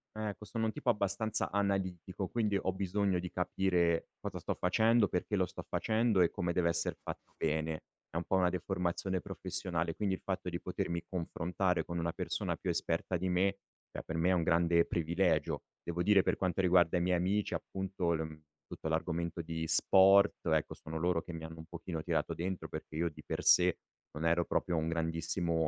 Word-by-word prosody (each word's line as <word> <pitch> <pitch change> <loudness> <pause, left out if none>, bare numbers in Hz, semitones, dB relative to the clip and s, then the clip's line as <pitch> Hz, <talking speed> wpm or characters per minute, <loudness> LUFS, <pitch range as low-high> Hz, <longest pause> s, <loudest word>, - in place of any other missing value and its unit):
Ecco, 105 -1 -4
sono 115 +2 -2
un 110 - +1
tipo 120 - +1
abbastanza 105 +1 -1
analitico, 95 -2 -1
quindi 105 -4 0
ho 95 - 0
bisogno 95 0 0
di 90 0 -4
capire 90 -2 +1
cosa - - -5
sto - - -2
facendo, 110 +4 +3
perché 90 +4 -1
lo 95 -2 +2
sto - - -8
facendo 110 -3 +2
e 85 - +5
come 85 0 -2
deve 85 -1 +2
esser 85 0 0
fatto - - -8
bene; 80 0 -1 0.3
è - - -16
un 85 - -1
pò 95 - +1
una 90 -1 +3
deformazione 90 0 -1
professionale. 90 -4 -3
Quindi 100 -3 0
il - - -4
fatto 95 -1 -2
di 85 0 -4
potermi 85 -1 -3
confrontare 90 +1 -1
con 85 - -5
una 85 0 0
persona - - -2
più - - -4
esperta 90 - 0
di 95 +2 -2
me, 95 +2 +2 0.3
è - - -7
per 80 - -4
me 90 +3 +3
un 85 -2 +2
grande 85 0 +3
privilegio. 85 -1 0 0.2
Devo 85 +1 -2
dire 100 0 +6
per - - +1
quanto 95 -1 0
riguarda 90 -1 +4
i 85 - +1
miei 90 0 +2
amici, 100 +4 0
appunto, 95 -3 -2
l 80 - -1
uhm, 80 -1 -6 0.3
tutto - - -6
l'argomento 85 +1 -1
di 80 0 -4
sport, 95 +4 +6
ecco, 80 -2 +1
sono 80 +1 -7
loro 85 -1 +1
che 85 - -8
mi 80 -1 -6
hanno 80 0 -8
un 80 - -9
pochino 85 -1 -6
tirato - - -1
dentro 90 +2 -3
perché 75 - -7
io 85 +1 +1
di 75 - -13
per - - -4
sé 90 0 +6 0.3
non 75 +2 -4
ero 85 +1 +3
proprio 85 -2 0
un 80 0 0
grandissimo, 80 +1 -1
90 Hz, 195 wpm, -33 LUFS, 85-95 Hz, 0.3 s, dire